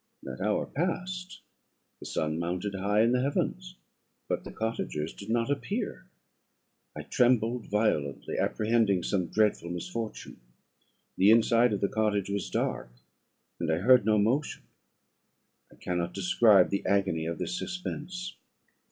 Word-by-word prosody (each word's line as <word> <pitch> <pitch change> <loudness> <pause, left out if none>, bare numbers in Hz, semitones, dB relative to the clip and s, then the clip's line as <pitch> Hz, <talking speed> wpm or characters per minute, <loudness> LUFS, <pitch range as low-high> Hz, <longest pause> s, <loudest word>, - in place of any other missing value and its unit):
That 65 -1 -7
hour 105 +2 +1
passed, 180 +3 -3 0.6
the - - -8
sun 80 +1 -2
mounted 90 +4 -2
high 100 +2 +1
in 115 - +3
the 125 0 +2
heavens, 180 +7 -2 0.5
but - - -2
the - - -8
cottagers 110 -8 -3
did 100 - -10
not 115 +3 +1
appear. 195 - -3 0.9
I - - -6
trembled 120 -2 +1
violently, 100 -10 -1
apprehending 110 -4 +1
some 90 -4 0
dreadful 105 -3 +1
misfortune. 105 +6 -5 0.8
The 95 +2 +5
inside 115 +1 +5
of 100 - -2
the 100 - +3
cottage 105 -3 0
was 100 0 -2
dark, - - -2 0.7
and 85 -2 -1
I 80 - +2
heard 125 +6 +5
no 110 +1 +3
motion; 125 +8 0 1.1
I - - -17
cannot 90 -1 -3
describe 100 +1 +4
the 100 - -1
agony 95 -5 +1
of 85 -1 -3
this 180 - -3
suspense. 180 0 -5
105 Hz, 135 wpm, -29 LUFS, 95-125 Hz, 1.1 s, The